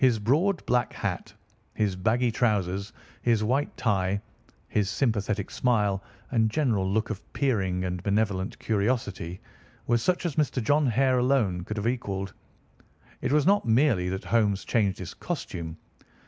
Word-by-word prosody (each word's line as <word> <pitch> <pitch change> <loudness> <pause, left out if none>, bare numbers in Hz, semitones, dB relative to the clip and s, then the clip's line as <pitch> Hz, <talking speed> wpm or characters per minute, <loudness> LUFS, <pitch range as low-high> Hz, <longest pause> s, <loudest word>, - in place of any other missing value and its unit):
His 125 -4 +5
broad 155 - +1
black 125 -1 +1
hat, - - -3 0.4
his 105 -3 0
baggy 115 +6 +1
trousers, 100 -4 0 0.3
his 115 -3 +2
white 130 +6 0
tie, 100 -3 +1 0.5
his 105 -2 0
sympathetic 105 -3 -1
smile, 105 -6 +1 0.3
and 110 -3 +3
general 110 -8 +1
look 110 +2 0
of 105 -2 -5
peering 95 -9 0
and 90 -1 -3
benevolent 100 -1 0
curiosity 100 -5 -1 0.5
were 120 0 +2
such 180 +8 0
as 160 -4 -2
Mr. 150 -3 +1
John 145 +5 +2
Hare 130 +2 +3
alone 120 -9 +2
could 105 +1 -5
have 105 - -2
equalled. 100 -6 -2 0.9
It - - -1
was 150 -1 +3
not 200 -7 +3
merely 115 -6 +3
that 95 +1 -3
Holmes 105 0 +1
changed 100 -5 +1
his 90 -1 -7
costume. 85 - -5
110 Hz, 145 wpm, -27 LUFS, 95-125 Hz, 0.9 s, His